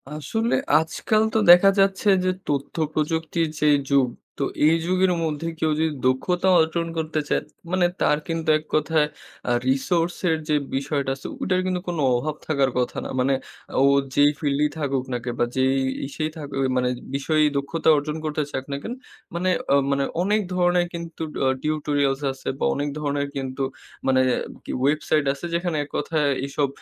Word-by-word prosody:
আসলে 220 Hz, +10 st, -2 dB, 0.2 s
আজকাল 165 Hz, +7 st, +1 dB
তো -, -, +2 dB
দেখা 180 Hz, +3 st, +9 dB
যাচ্ছে 195 Hz, +1 st, +2 dB, 0.2 s
যে 185 Hz, -, +2 dB, 0.2 s
তথ্য 140 Hz, -1 st, -2 dB, 0.2 s
প্রযুক্তির 160 Hz, +2 st, 0 dB
যেই 150 Hz, -1 st, +5 dB
যুগ, 140 Hz, -2 st, +4 dB, 0.3 s
তো -, -, -1 dB, 0.2 s
এই 160 Hz, -, +5 dB
যুগের 185 Hz, +1 st, +2 dB
মধ্যে 160 Hz, 0 st, -2 dB
কেউ 155 Hz, -, +1 dB
যদি 160 Hz, 0 st, +1 dB
দক্ষতা 175 Hz, +9 st, +1 dB
অর্জন 160 Hz, +1 st, 0 dB
করতে 160 Hz, -1 st, -1 dB
চায় -, -, +2 dB, 0.3 s
মানে 185 Hz, -1 st, +3 dB, 0.2 s
তার 150 Hz, -, +3 dB
কিন্তু 165 Hz, -1 st, -2 dB
এক -, -, -14 dB
কথায় 155 Hz, -1 st, +2 dB, 0.4 s
আ -, -, +2 dB, 0.2 s
resource 165 Hz, +6 st, +1 dB
এর 160 Hz, -, +2 dB
যে 150 Hz, -, +3 dB, 0.2 s
বিষয়টা 140 Hz, 0 st, -1 dB
আছে 135 Hz, -, -8 dB
ওটার 185 Hz, -1 st, +1 dB
কিন্তু 185 Hz, -1 st, -1 dB
কোনো 170 Hz, -3 st, -2 dB
অভাব 145 Hz, +5 st, -2 dB
থাকার 140 Hz, -4 st, +2 dB
কথা 125 Hz, -, -1 dB
না। -, -, -5 dB
মানে 130 Hz, +2 st, +2 dB, 0.5 s
ও -, -, +6 dB, 0.3 s
যেই 145 Hz, 0 st, +6 dB
field 140 Hz, -2 st, 0 dB
এই -, -, +1 dB
থাকুক 140 Hz, -4 st, -1 dB
নাকে 120 Hz, 0 st, -3 dB
বা -, -, +4 dB
যেই 130 Hz, 0 st, +2 dB, 0.3 s
ইসেই 155 Hz, +2 st, -3 dB
থাকুক 145 Hz, -3 st, -6 dB, 0.2 s
মানে 125 Hz, 0 st, +2 dB, 0.3 s
বিষয়েই 155 Hz, +2 st, +2 dB
দক্ষতা 155 Hz, +4 st, 0 dB
অর্জন 150 Hz, +2 st, -2 dB
করতে 155 Hz, 0 st, -1 dB
চাক 130 Hz, -, -3 dB
না -, -, -1 dB
কেন 235 Hz, -, -4 dB, 0.4 s
মানে, 180 Hz, +2 st, 0 dB, 0.4 s
মানে 140 Hz, 0 st, +1 dB, 0.2 s
অনেক 210 Hz, +4 st, +2 dB
ধরনের 175 Hz, -1 st, +2 dB
কিন্তু 170 Hz, -1 st, -7 dB, 0.2 s
আ -, -, +4 dB, 0.2 s
tutorials 145 Hz, -2 st, 0 dB
আছে 135 Hz, -, -11 dB
বা -, -, +1 dB
অনেক 145 Hz, +1 st, -1 dB
ধরনের 145 Hz, -1 st, -1 dB
কিন্তু 135 Hz, 0 st, -4 dB, 0.5 s
মানে 130 Hz, -1 st, +4 dB, 0.2 s
আর -, -, -2 dB, 0.2 s
কি -, -, -5 dB, 0.2 s
website 150 Hz, 0 st, +1 dB
আছে 140 Hz, -, -8 dB
যেখানে 170 Hz, -2 st, -1 dB
এক 145 Hz, -, -12 dB
কথায় 150 Hz, 0 st, 0 dB, 0.2 s
এইসব 140 Hz, +1 st, 0 dB
155 Hz, 175 wpm, -23 LUFS, 140-170 Hz, 0.5 s, দেখা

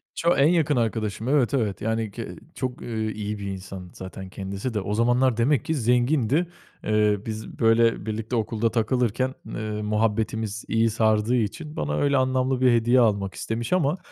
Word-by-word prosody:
Ço 170 Hz, +1 st, +2 dB
en 140 Hz, -, +5 dB
yakın 160 Hz, -4 st, +2 dB
arkadaşım. 110 Hz, -2 st, -1 dB
Evet, 135 Hz, -3 st, +2 dB
evet. 110 Hz, -7 st, 0 dB
Yani 110 Hz, -1 st, -1 dB
ki -, -, -6 dB, 0.3 s
çok, 130 Hz, -1 st, -4 dB
ııı, 110 Hz, -2 st, -3 dB
iyi 105 Hz, 0 st, -4 dB
bir 100 Hz, -, -5 dB
insan 95 Hz, -1 st, -7 dB
zaten 95 Hz, 0 st, -8 dB
kendisi 100 Hz, +5 st, -5 dB
de. 105 Hz, -, -1 dB
O 100 Hz, +2 st, -3 dB
zamanlar 120 Hz, +2 st, +2 dB
demek 125 Hz, +2 st, +2 dB
ki 160 Hz, -, 0 dB
zengindi. 125 Hz, +5 st, +2 dB, 0.4 s
Iıı, 105 Hz, -1 st, +1 dB
biz, 110 Hz, -1 st, -6 dB
böyle, 115 Hz, 0 st, +3 dB
birlikte 110 Hz, +2 st, -3 dB
okulda 115 Hz, 0 st, 0 dB
takılırken, 125 Hz, +2 st, 0 dB
ııı, 105 Hz, -1 st, -4 dB
muhabbetimiz 110 Hz, 0 st, -1 dB
iyi 115 Hz, 0 st, +2 dB
sardığı 110 Hz, +1 st, +2 dB
için 150 Hz, +8 st, -2 dB
bana 75 Hz, 0 st, -2 dB
öyle 140 Hz, -, +2 dB
anlamlı 130 Hz, 0 st, +1 dB
bir 130 Hz, -1 st, +5 dB
hediye 120 Hz, +2 st, +4 dB
almak 100 Hz, -4 st, +2 dB
istemiş 115 Hz, +4 st, -3 dB
ama 160 Hz, -2 st, +2 dB
115 Hz, 170 wpm, -25 LUFS, 105-130 Hz, 0.4 s, en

